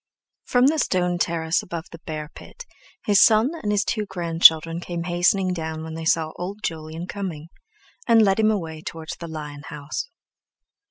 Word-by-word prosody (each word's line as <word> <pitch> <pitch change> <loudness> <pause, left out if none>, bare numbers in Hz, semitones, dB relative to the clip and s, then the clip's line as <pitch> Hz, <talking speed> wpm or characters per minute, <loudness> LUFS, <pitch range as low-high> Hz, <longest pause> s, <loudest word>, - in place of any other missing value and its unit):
From 250 0 +3
the 310 +3 +3
stone 180 -6 0
terrace 165 -1 0
above 170 -2 -6
the 165 - -10
bear 155 -1 -5
pit 485 - -12 0.4
his 205 -2 +5
son 220 +5 +5
and 210 - -1
his 205 -1 +1
two 215 -2 -2
grandchildren 165 -2 +4
came 175 -1 -5
hastening 180 +2 +1
down 160 -2 -4
when 160 0 -7
they 160 0 -6
saw 160 -1 +1
old 195 +4 -6
Jolyon 160 +1 -4
coming, 175 -6 -6 0.6
and 230 -2 +6
led 195 0 +2
him 215 0 +4
away 165 -7 -3
towards 160 0 -7
the 170 - -7
lion 150 -2 -7
house. 150 - -5
170 Hz, 170 wpm, -23 LUFS, 160-200 Hz, 0.6 s, and